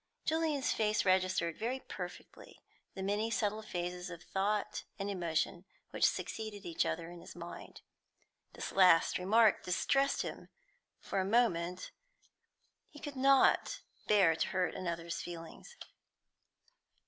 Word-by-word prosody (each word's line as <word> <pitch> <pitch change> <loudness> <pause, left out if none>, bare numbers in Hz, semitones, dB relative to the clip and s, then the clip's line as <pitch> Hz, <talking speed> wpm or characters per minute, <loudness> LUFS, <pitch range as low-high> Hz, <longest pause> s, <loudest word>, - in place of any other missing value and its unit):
Julian's 315 -4 +1
face 215 -1 +1
registered 185 -3 +2
very 245 +4 -1
perfectly - - -9 0.4
the 190 - -4
many 205 +3 0
subtle 215 0 0
phases 180 -3 -4
of 170 0 -9
thought 200 +3 -1
and 200 +1 -3
emotion 170 -1 -1 0.3
which - - +4
succeeded 215 -2 -5
each 170 -2 0
other 165 +1 -3
in 175 - -10
his - - -11
mind. - - -9 0.7
This - - -5
last 180 -4 +5
remark 215 +3 +4
distressed 275 +9 +1
him - - -7 0.5
for 195 - -3
a - - +2
moment; 185 -5 +1 1.0
he - - -15
could 290 -1 -7
not 275 - +4 0.3
bear 190 -6 +5
to - - 0
hurt 185 -1 0
another's 170 -1 -4
feelings. 170 - -9
195 Hz, 125 wpm, -33 LUFS, 175-220 Hz, 1.0 s, last